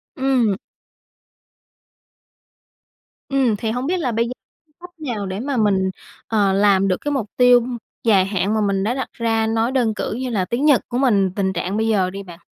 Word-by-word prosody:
Ừm. 260 - +1 2.7
Ừm. 265 -5 +2
Thì 220 +1 -2
hông 250 +3 -3
biết 365 +3 0
là 265 -7 -1
bây 230 +1 0
giờ 245 - -6 0.5
cách 355 +1 -11
nào 240 -9 -4
để 190 +1 -4
mà 270 +2 -2
mình, 195 -4 +2 0.4
ờ, 205 -3 +2
làm 195 -1 +3
được 185 - +1
cái 290 - -2
mục 255 -7 -2
tiêu 245 -1 +5 0.4
dài 200 -5 +4
hạn 195 +1 -1
mà 220 - +1
mình 200 -2 0
đã 220 +4 0
đặt 265 0 -4
ra, 225 -1 0
nói 225 +2 0
đơn 245 -5 +1
cử - - -4
như 255 +3 -3
là 200 -6 0
tiếng 240 +8 -1
Nhật 290 -5 +5
của 245 - -3
mình, 205 -8 +2
tình 190 -2 0
trạng 195 +1 -2
bây 220 +1 0
giờ 195 -5 +2
đi 195 +1 -7
bạn? 175 -3 -12
220 Hz, 195 wpm, -20 LUFS, 195-250 Hz, 2.7 s, tiêu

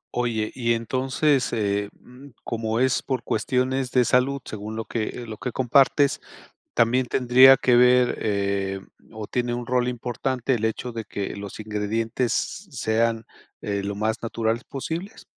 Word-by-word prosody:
Oye, 115 -3 -1
y 115 -2 0
entonces, 130 +4 0
eh, 100 -2 0
mm, 125 +3 -15 0.2
como 115 0 -2
es 130 0 +2
por 130 -3 -3
cuestiones 130 +3 0
de 125 -1 +3
salud, 130 +2 +1
según 110 +1 -6
lo 115 0 -4
que 110 -2 -2
eh, 120 - -7
lo 110 -2 -8
que 125 - -4
compartes, 135 +3 +3 0.5
¿también 125 +2 +3
tendría 130 +2 +6
que 125 -1 +3
ver, 125 0 +5
eh, 100 -2 -1 0.3
o 110 -1 -7
tiene 120 -1 -1
un 120 0 -5
rol 125 -1 +1
importante 125 +1 -2
el 110 - -2
hecho 110 +2 -2
de 115 -2 -6
que 100 -1 -5
los 100 +1 -8
ingredientes 110 +3 -2
sean, 115 - -1 0.4
eh, 100 -1 -3
lo 100 - -3
más 110 +2 -1
naturales 115 +1 -2
posibles? 165 +8 -6
120 Hz, 155 wpm, -24 LUFS, 110-130 Hz, 0.5 s, tendría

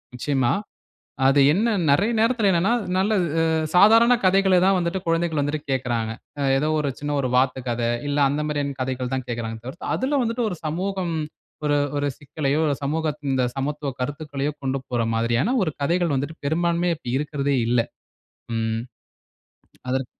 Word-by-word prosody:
நிச்சயமா. 130 -1 +1 0.7
அது 135 +1 +5
என்ன, 220 +4 +1 0.2
நெறய 200 +12 +3
நேரத்தில 225 -3 +3
என்னனா, 180 +6 +2 0.3
நல்ல 205 +3 +2 0.6
சாதாரண 225 +5 +7
கதைகள 190 0 +4
தான் 195 0 +4
வந்துட்டு, 175 +2 -1
குழந்தைகள் 165 -2 +1
வந்துட்டு 145 +1 -2
கேட்குறாங்க. 120 -4 -1 0.5
ஏதோ 150 +3 0
ஒரு 145 - -1
சின்ன 145 0 -2
ஒரு 130 - -1
வாத்து 130 0 +2
கத, 120 0 -2 0.3
இல்ல 145 0 0
அந்த 145 +2 -1
மாரியான 145 -2 -2
கதைகள் 130 0 -3
தான் 130 -1 -3
கேட்கிறாங்களே 115 -1 -4
தவிர்த்து, 145 +8 -5
அதில 275 +2 0
வந்துட்டு 230 +1 -1
ஒரு 180 - -4
சமூகம், 180 +2 -2 0.5
ஒரு 145 0 +2 0.2
ஒரு 145 - 0
சிக்கலையோ, 145 0 -1
இல்ல 145 - +1
சமூகத்தின் 150 -1 -2
இந்த 130 - +2
சமத்துவ 145 +1 -2
கருத்துக்களையோ 145 +1 -3
கொண்டு 135 +1 0
போர்ற 120 -2 0
மாரியான, 120 - +1
ஒரு 155 - -2
கதைகள் 170 +1 +1
வந்துட்டு 145 +5 -3
பெரும்பான்மையா, 170 +2 +1
இப்ப - - -10
இருக்கிறதே 145 -1 -1
இல்ல. 120 0 +3 0.8
ம். 115 0 -1 1.1
அதற்க் 130 0 0
145 Hz, 150 wpm, -23 LUFS, 130-175 Hz, 1.1 s, சாதாரண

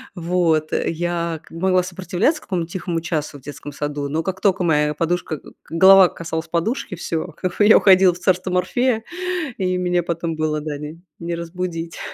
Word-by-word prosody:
Вот, 165 -3 +1
я 170 -1 -1
как - - -20
могла 185 +2 +1
сопротивляться 190 - -1
какому-то 175 -3 -3
тихому 175 -3 -3
часу 155 -3 -3
в - - -17
детском 145 +1 -8
саду, 145 0 -3
но 160 +2 -1
как 190 0 -3
только 195 -2 +2
моя 150 -2 +2
подушка 165 -1 -1
к - - -24 0.2
голова 190 +2 +7
касалась 165 -1 -5
подушки- 180 +5 -2
всё, 165 0 -3
как 180 -1 -3
бы 205 - +4
я 220 - +8
уходила 185 -2 +6
в - - -11
царство 185 0 +1
Морфея 220 +6 +1 0.6
и 185 -1 0
меня 180 -1 +1
потом 170 -1 -3
было, 155 -1 -1
да, 150 -1 -4
не, 150 +3 -8 0.2
не 170 0 -3
разбудить. 170 -1 -5
170 Hz, 180 wpm, -21 LUFS, 160-185 Hz, 0.6 s, я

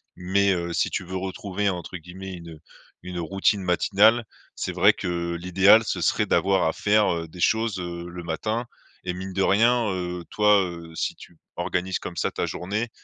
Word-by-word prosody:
mais, 100 +2 +2
heu, 85 -1 -3
si - - +1
tu - - -2
veux 95 +2 -6
retrouver 95 +1 -2
entre 90 -1 -5
guillemets 95 +3 -9
une 85 -3 -10 0.4
une 90 -1 -6
routine 95 +3 +1
matinale 105 +6 +3 0.3
c'est - - -4
vrai - - +5
que, 85 -1 -3
l'idéal 95 +5 +5
ce - - -3
serait - - +1
d'avoir 95 -3 +2
à 80 - 0
faire, 105 0 +2
heu, 80 0 -4
des 90 +3 -13
choses, 110 +1 +1
heu, 85 -1 -5
le 90 0 -8
matin 110 +9 -2 0.4
et 90 - -2
mine 95 +1 -6
de 95 - 0
rien, 115 +4 +3
heu, 90 -2 -3
toi, 105 -1 +4
heu, 85 -2 -7
si - - -2
tu 85 - -15 0.2
organises 95 +1 -1
comme - - -8
ça - - 0
ta - - -2
journée, 105 +6 -3
95 Hz, 190 wpm, -25 LUFS, 85-100 Hz, 0.4 s, vrai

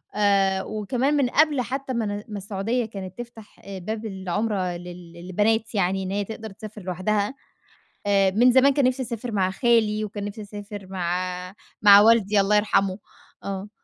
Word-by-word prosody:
آآ 195 -2 +2
وكمان 240 +7 -1
من 265 -3 +2
قبل 295 -1 +3
حتّى 265 +2 -4
مان 210 -3 -2
ما 210 - -5
السعودية 205 +5 -2
كانت 195 -3 -8
تفتح، 230 -3 -11
آآ 195 -1 -7
باب 220 +4 -5
العُمرة 190 -2 -2
لل 175 -1 -11
للبنات 210 +6 -1
يعني 190 0 +1
إن 185 - -4
هي 205 +1 -1
تقدر 220 +1 -7
تسافر 215 +1 -10
لوحدها، 200 +6 -1 0.7
آآ 195 -1 +3
من 240 +5 +5
زمان 265 +2 +5
كان 275 -2 +2
نفسي 255 +1 +1
أسافر 235 0 -5
مع 190 -2 +1
خالي، 215 -1 +2
وكان 205 -1 -6
نفسي 205 +1 -6
أسافر 205 -1 -9
مع 180 0 -3 0.3
مع 205 -1 +9
والدي- 215 -2 +4
الله 205 +2 +2
يرحمه- 200 -2 +1 0.5
آه. 195 +1 -5
205 Hz, 165 wpm, -24 LUFS, 190-225 Hz, 0.7 s, مع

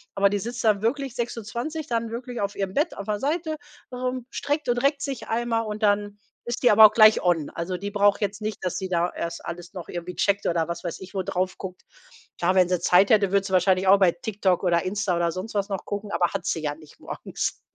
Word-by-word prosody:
Aber 200 0 +4
die 205 0 -1
sitzt 235 +4 -5
dann 210 -3 +3
wirklich 265 +2 -1
6:20 240 +7 -4
dann 230 -3 -1
wirklich 240 0 -5
auf 200 0 -2
ihrem 195 -1 -3
Bett, 305 - 0
auf 200 - -6
der 210 -1 -1
Seite, 315 - -1 0.4
ähm, 250 0 -3
streckt 290 0 -2
und 245 0 +2
reckt 275 +2 +1
sich 275 -3 -4
einmal 230 0 0
und 215 0 -5
dann 205 0 +1 0.3
ist 240 +2 -4
die 245 - +6
aber 215 +1 +9
auch - - -8
gleich 215 -1 +7
on. 170 -4 +1
Also, 180 +2 -4
die 200 +3 -5
braucht 205 0 +3
jetzt 205 +1 -2
nicht, 215 0 -3
dass 180 - -1
sie 190 -1 -4
da 175 0 +1
erst 170 - -5
alles 175 +2 -7
noch 180 -4 -7
irgendwie 175 +1 -6
checkt 200 0 +1
oder 170 -1 +1
was 170 0 -5
weiß 170 -2 -4
ich 190 +1 -10
wo 195 - -1
drauf 185 -1 -2
guckt. 185 -1 -8 0.6
Klar, 180 +2 +2
wenn 185 -2 +5
sie 180 -1 +1
Zeit 185 +4 +4
hätte, 200 -3 +4
würde 200 -1 +2
sie 190 - -5
wahrscheinlich 185 +1 +3
auch 195 +1 +7
bei 185 -3 +5
TikTok 190 0 -1
oder 170 -2 +3
Insta 195 0 -1
oder 170 0 +1
sonst 185 +6 -6
was 200 0 0
noch 195 -2 -4
gucken, 205 0 -5
aber 175 0 +2
hat 195 -3 -3
sie 160 - -1
ja 145 -1 -1
nicht 155 -1 -17
morgens. - - -4
200 Hz, 245 wpm, -25 LUFS, 180-230 Hz, 0.6 s, aber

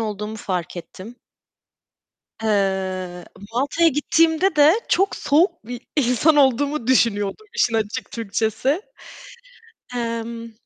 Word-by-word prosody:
olduğumu 210 0 -4
fark 180 -4 -4
ettim. 195 +7 -10 1.3
Eee, 190 -4 -1 0.3
Malta'ya 285 +7 +2
gittiğimde 320 +4 +2
de 295 +2 +7 0.2
çok 390 +2 +2
soğuk 335 - +1
bir 245 +1 -7 0.2
insan 285 +4 +3
olduğumu 280 -1 +2
düşünüyordum 230 - +1
işin 230 - +1
açık 220 +3 -2
Türkçesi. 230 - -1 1.1
Emm 230 0 -4
235 Hz, 95 wpm, -21 LUFS, 210-290 Hz, 1.3 s, de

